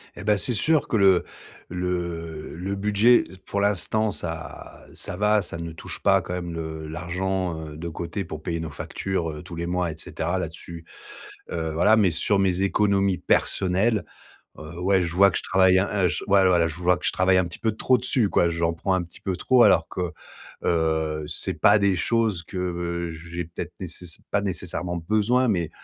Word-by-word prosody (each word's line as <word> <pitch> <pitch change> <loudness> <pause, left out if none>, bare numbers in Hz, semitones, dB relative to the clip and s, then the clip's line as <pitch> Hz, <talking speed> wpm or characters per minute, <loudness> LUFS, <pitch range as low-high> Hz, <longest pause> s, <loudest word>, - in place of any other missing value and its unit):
Et - - -8
ben, 105 0 +3
c'est 120 +6 +1
sûr 150 +7 +2
que 115 - +1
le 95 -3 +5 0.5
le 85 -3 -4
le 95 +4 -3
budget 105 +4 +4 0.2
pour 100 - -2
l'instant 105 +2 +2
ça 80 -3 -7
ça 90 - -3
va, 105 +1 +3
ça 85 -2 -3
ne 85 0 -6
touche 80 - -8
pas - - +4
quand 90 - -6
même 85 -1 -4
le 80 -1 -5
l'argent, 90 +1 -2
heu, 75 0 -9
de 85 +2 -5
côté 85 +4 -4
pour 80 -3 -8
payer 85 0 -2
nos 80 -1 -4
factures, 90 +1 -3
heu, 75 -1 -8
tous 85 - -9
les 85 +1 -3
mois, 90 -1 -1
et 80 - -10
cetera. 85 +3 -3
Là-dessus, 85 0 -7 0.7
heu, 80 -2 -2
voilà, 90 +8 +4
mais 100 -4 +4
sur 100 +5 +1
mes 95 -1 +1
économies 100 -1 +2
personnelles, 100 +4 +1 0.5
heu, 80 +3 -9
ouais. 95 0 +3
Je 85 -1 -3
vois 100 +2 +6
que - - -2
je - - -5
travaille, 95 0 +4
hein, 95 - +1 0.2
heu, - - +5
j 90 - -3
ouais 100 -1 +4
voilà 90 -2 +4
je 80 - -7
vois 90 +1 +2
que - - -5
je - - +2
travaille 95 0 +3
un 90 - +3
petit 85 0 -8
peu 110 - +1
trop 125 +4 +2
dessus, 125 -2 +1
quoi. 85 - +3
J'en 85 0 0
prends 95 +3 -1
un 95 - +1
petit 85 -1 -14
peu 95 -2 -2
trop 130 +4 +4
alors - - +5
que, 90 -2 -3 0.5
heu, 80 -2 0
c'est - - -3
pas 105 +1 +5
des 100 -2 +2
choses 110 -3 0
que 85 -1 -3 0.2
j'ai 85 0 -3
peut-être 80 - -7
nécess 85 -2 -5
pas 100 - +2
nécessairement 90 -2 -3
besoin 110 +9 +1
mais, 85 -7 0
90 Hz, 200 wpm, -24 LUFS, 85-100 Hz, 0.7 s, vois